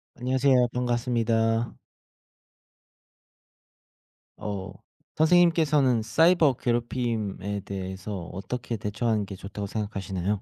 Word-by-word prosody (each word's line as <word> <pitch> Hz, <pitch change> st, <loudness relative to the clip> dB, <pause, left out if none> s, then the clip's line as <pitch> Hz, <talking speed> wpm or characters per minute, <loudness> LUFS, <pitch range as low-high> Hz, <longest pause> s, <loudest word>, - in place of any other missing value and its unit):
안녕하세요. 130 Hz, 0 st, +3 dB
반갑습니다. 120 Hz, -2 st, +1 dB, 2.6 s
어. 100 Hz, -3 st, -5 dB, 0.4 s
선생님께서는 155 Hz, -7 st, +4 dB
사이버 160 Hz, +6 st, +4 dB
괴롭힘에 115 Hz, -5 st, -2 dB
대해서 95 Hz, 0 st, -5 dB
어떻게 115 Hz, +5 st, -4 dB
대처하는 105 Hz, +1 st, -1 dB
게 100 Hz, 0 st, -8 dB
좋다고 100 Hz, +2 st, -6 dB
생각하시나요? 100 Hz, -2 st, -3 dB
115 Hz, 255 characters per minute, -26 LUFS, 100-125 Hz, 2.6 s, 선생님께서는